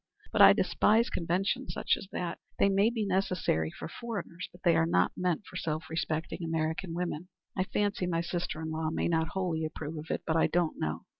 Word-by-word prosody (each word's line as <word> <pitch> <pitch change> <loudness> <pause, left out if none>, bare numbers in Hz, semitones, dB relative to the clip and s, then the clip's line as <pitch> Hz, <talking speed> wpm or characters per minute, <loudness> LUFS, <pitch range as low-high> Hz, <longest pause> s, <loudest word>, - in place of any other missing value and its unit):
But - - +3
I - - +10
despise 225 +3 +3
conventions 190 +9 -1
such - - +2
as - - -9
that. 175 -1 -3 0.2
They 200 - +4
may 200 +3 +4
be 230 -3 -1
necessary 185 - +1
for - - -7
foreigners; 200 -4 -6
but 175 - -18
they 170 -3 +5
are 165 0 +3
not 90 - +3
meant 180 +1 -1
for 180 - -8
self 160 -1 -3
respecting 160 +1 -2
American 165 +2 -1
women. 175 -1 -3 0.3
I 185 - +1
fancy 205 -2 0
my 165 -1 +1
sister 170 -2 -3
in 160 - -3
law 160 0 -1
may 160 - 0
not 160 -1 +1
wholly 175 -4 -1
approve 155 0 -4
of 155 - -9
it, - - -2
but 160 - 0
I 165 - +4
don't 175 -2 0
know. 80 +2 -2
170 Hz, 210 wpm, -30 LUFS, 160-190 Hz, 0.3 s, I